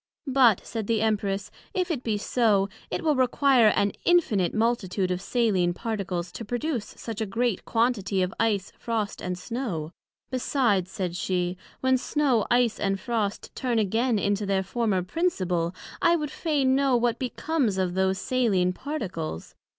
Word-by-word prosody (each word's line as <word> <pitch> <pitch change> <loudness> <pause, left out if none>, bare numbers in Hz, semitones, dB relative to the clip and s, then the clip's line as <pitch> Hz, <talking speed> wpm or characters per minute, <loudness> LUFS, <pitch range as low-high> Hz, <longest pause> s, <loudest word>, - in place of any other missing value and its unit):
But, 255 -7 +4
said 220 -1 -4
the 225 -2 +1
Empress, 200 -3 -1 0.2
if 365 -2 0
it 285 -7 -2
be 220 -4 -1
so, 205 -2 +2 0.2
it - - -3
will 310 -2 +3
require 255 -1 +4
an 200 -1 +3
infinite 220 - +3
multitude 210 -5 0
of 180 0 -2
saline 195 -7 +1
particles 190 -6 -3
to 185 - -7
produce 245 +2 -3
such 225 -1 -5
a 220 - -1
great 230 0 -1
quantity 215 -5 +1
of 185 - -2
Ice, 210 -4 +1
Frost 220 -3 -2
and 180 0 -3
Snow: 195 - -4 0.4
besides, 240 -8 +1
said 180 -2 -3
she, 180 -1 -1 0.3
when 260 0 +3
Snow, 265 -6 +1
Ice 245 -2 +2
and 195 -1 0
Frost, 215 -1 -2
turn 245 -3 -1
again 225 +3 +1
into 200 0 0
their 195 -1 +1
former 200 -2 0
principle, 180 - -1 0.3
I 340 -1 +5
would 300 -3 -2
fain 280 -5 +1
know 270 -2 +3
what 235 0 0
becomes 255 -4 -1
of 185 -2 0
those 190 +1 +1
saline 195 -7 +1
particles? 185 - -5
220 Hz, 160 wpm, -26 LUFS, 190-250 Hz, 0.4 s, I